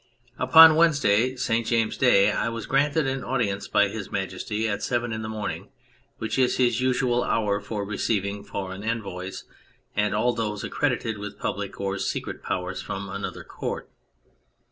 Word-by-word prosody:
Upon 160 +5 +9
Wednesday, 130 -7 +3
St. 115 -2 0
James's 115 -1 +1
Day, 100 -7 +5
I 115 - 0
was 115 -1 -5
granted 145 +2 +2
an 135 0 -2
audience 105 -7 -1
by 105 0 +3
His 100 0 -6
Majesty 100 +3 -2
at 105 -1 -2
seven 120 +2 -1
in 110 - -4
the 110 - -5
morning, 110 -1 -4 0.5
which 110 +4 -2
is 125 -1 +3
his 120 -2 +2
usual 125 -1 +1
hour 105 -4 +1
for 105 0 -4
receiving 100 -1 -1
foreign 100 -1 -6
envoys 95 -5 -4 0.5
and 105 0 +1
all 120 +3 +2
those 105 -3 -3
accredited 120 -6 -1
with 105 0 -7
public 100 -1 -4
or 95 -1 -2
secret - - -3
powers 90 +1 -3
from 100 0 -5
another 100 +1 -5
Court. - - -6
110 Hz, 160 wpm, -25 LUFS, 100-125 Hz, 0.5 s, Upon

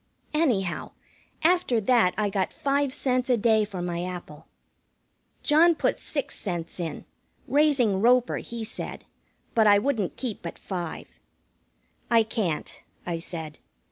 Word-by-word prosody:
Anyhow, 235 - 0 0.5
after 340 -8 +3
that 220 -4 +3
I 210 -1 +1
got 190 -1 0
five 280 0 0
cents 255 -2 0
a 245 - +4
day 220 0 +3
for 190 -4 -5
my 175 0 -2
apple. 180 -5 -7 1.0
John 325 +3 +5
put - - 0
six 285 -3 -4
cents 175 -3 -4
in, 165 -2 -4 0.4
raising 270 -10 +3
Roper, 245 +2 +4
he 235 -1 -6
said, 220 - -7 0.5
but 220 -2 +4
I 205 -1 +7
wouldn't 215 -4 -1
keep 245 -6 -4
but - - -7
five. 175 -4 -5 1.0
"I 230 -1 +5
can't," 210 -8 -3 0.2
I 170 -2 -2
said. 160 -3 -7
220 Hz, 135 wpm, -26 LUFS, 180-255 Hz, 1.0 s, I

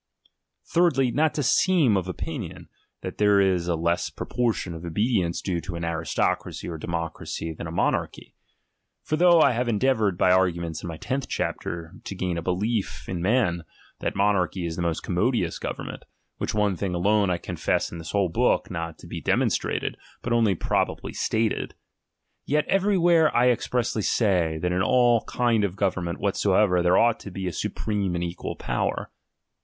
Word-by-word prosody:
Thirdly, 135 -8 +2
not 155 +4 +1
to 145 - 0
seem 150 - +3
of 95 -2 -1
opinion, 90 - -6 0.3
that - - -7
there 105 -1 +5
is 95 -3 +2
a 85 - +1
less 85 +2 0
proportion 115 -7 -2
of 80 0 -8
obedience 90 0 0
due 90 -3 -1
to 90 -1 -6
an 85 0 -3
aristocracy 80 -1 -1
or 85 -2 -5
democracy 85 0 -4
than 80 - -7
a - - -6
monarchy. 85 - -1 0.7
For 155 - -1
though 170 0 +6
I - - +6
have 120 0 -1
endeavoured, 110 -4 +1
by 90 - +4
arguments 85 -3 +1
in - - -6
my 80 -2 -5
tenth 130 +9 -3
chapter, 85 0 -3
to 100 - -6
gain 90 -1 -2
a 85 - -2
belief 100 +5 -2
in 90 -3 -3
me:i, 100 -3 +2 0.4
that - - -2
monarchy 95 -3 +1
is 80 -1 -3
the 90 - -3
most 85 -2 -1
commodious - - 0
government; - - -5 0.4
which - - -2
one 105 -2 +2
thing 90 0 -2
alone 100 +2 +2
I 90 - +1
confess - - -1
in 85 - -7
this 80 0 -8
whole 100 -1 +1
book 80 - +1
not 85 -1 -4
to - - -14
be - - -6
demonstrated, - - 0 0.3
but 120 - -1
only 115 -5 +3
probably - - -1
stated; 110 -1 -1 0.7
yet 150 +2 +2
every 195 +1 +2
where 170 -2 +4
I 125 +1 +5
expressly 120 -2 -1
say, 90 -8 +1
that 90 - +1
in 90 +1 +1
all 120 +1 +4
kind 120 -3 +1
of 95 -2 -1
government 95 -3 -1
whatsoever 100 -2 +2
there 90 +1 +4
ought 115 -1 +3
to - - -8
be 95 0 -5
a 90 - -2
supreme 100 +3 -2
and 85 - -1
equal 85 0 -4
power. - - -2
95 Hz, 175 wpm, -25 LUFS, 85-120 Hz, 0.7 s, though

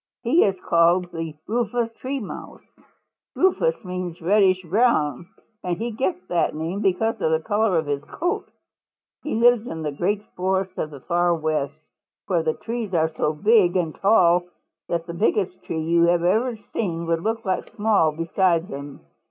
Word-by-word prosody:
He 265 +9 +4
is 195 -2 0
called 170 +1 +3
the 165 -2 -5
Rufous 230 +1 -1
Tree 270 +4 -4
Mouse. 210 - -9 0.7
Rufous 380 - +1
means 180 -2 -5
reddish 185 +1 +3
brown, 170 - +1 0.4
and 175 -2 -2
he 235 +4 -3
gets 185 -4 -2
that 175 -4 0
name 165 +6 -3
because 205 +3 0
of - - +2
the 160 0 +2
color 205 +2 +1
of 160 - 0
his 145 0 -2
coat. 350 +2 -3 0.7
He 300 - -3
lives 240 0 +4
in 160 -8 -5
the 150 - -2
great 195 +8 -1
forests 190 0 -1
of 155 - -2
the 140 -3 -11
Far 175 +1 +1
West, 155 -2 -2 0.5
where 175 -3 +1
the 160 -1 -1
trees 225 -4 -4
are 160 -1 +2
so 155 -1 -1
big 195 +2 +3
and 165 -4 -1
tall 180 -4 +4 0.4
that 170 -1 -1
the 170 - -6
biggest 185 0 0
tree 165 - -3
you 170 +2 +3
have 175 0 +2
ever 225 +7 +2
seen 180 -5 -4
would 165 0 0
look 225 +3 -2 0.3
small 205 -7 +3
beside 165 +2 +1
them. 140 0 -8
180 Hz, 170 wpm, -23 LUFS, 165-215 Hz, 0.7 s, He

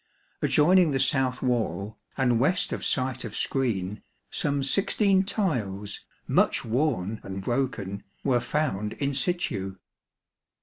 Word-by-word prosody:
Adjoining 175 +3 +5
the 135 -2 0
south 130 -2 +2
wall, 110 -5 -1 0.2
and 125 -4 +2
west 180 +9 +2
of - - -4
site 130 -1 0
of 110 - -6
screen, 105 -7 -1 0.3
some 140 -1 0
sixteen 195 +5 +3
tiles, 110 - -2 0.3
much - - +2
worn 115 -5 0
and 95 0 -6
broken, 110 -5 -2 0.2
were 130 -3 +3
found 120 -6 -1
in 140 0 -2
situ. 130 - -1
130 Hz, 120 wpm, -27 LUFS, 105-150 Hz, 0.3 s, Adjoining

